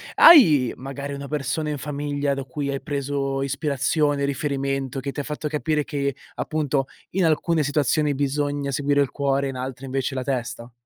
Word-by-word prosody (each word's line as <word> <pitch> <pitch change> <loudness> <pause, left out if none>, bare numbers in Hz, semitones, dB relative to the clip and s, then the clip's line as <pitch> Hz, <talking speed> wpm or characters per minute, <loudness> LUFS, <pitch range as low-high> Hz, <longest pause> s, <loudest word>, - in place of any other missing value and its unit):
Hai 155 - +8
magari 140 +2 -6
una 140 0 -6
persona 150 +2 -2
in 150 - -2
famiglia 145 0 -2
da 135 0 -3
cui 140 +2 -4
hai 135 - -3
preso 140 -1 -2
ispirazione, 140 +1 0
riferimento, 135 -1 -2
che 140 +1 -4
ti - - -6
ha 145 - -1
fatto 150 +1 -4
capire 150 0 0
che, 140 -3 -2 0.2
appunto, 145 -3 -1 0.2
in 190 0 +1
alcune 160 0 +2
situazioni 145 +1 +1
bisogna 145 0 -1
seguire 145 +1 +2
il 140 - 0
cuore, 140 -1 0
in 130 - -6
altre 130 +1 -5
invece 135 +1 -2
la 130 - -2
testa? 120 -2 -3
140 Hz, 170 wpm, -23 LUFS, 135-150 Hz, 0.2 s, Hai